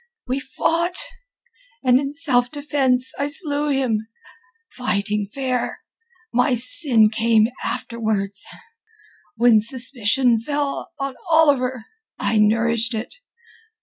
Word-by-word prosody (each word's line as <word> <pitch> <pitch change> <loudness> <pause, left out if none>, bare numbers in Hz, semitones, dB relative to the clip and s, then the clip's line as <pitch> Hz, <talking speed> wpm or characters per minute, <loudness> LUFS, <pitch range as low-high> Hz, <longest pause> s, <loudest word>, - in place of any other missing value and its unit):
We 255 +2 -2
fought, 330 +6 -1 0.9
and 255 0 +4
in 280 +1 -4
self 250 -6 +1
defence 270 -3 0
I 285 - 0
slew 295 -1 +2
him—fighting 225 - -4
fair. 255 +2 -3 0.5
My 250 +2 +2
sin 235 -3 +5
came 225 -1 +2
afterwards. 215 -4 -3 0.9
When 235 -1 +4
suspicion 240 0 +1
fell 285 +3 -3
on 275 -1 -4 0.2
Oliver, 265 -7 +2 0.3
I 220 - 0
nourished 230 +2 +1
it... 220 - -6
250 Hz, 95 wpm, -21 LUFS, 225-280 Hz, 0.9 s, sin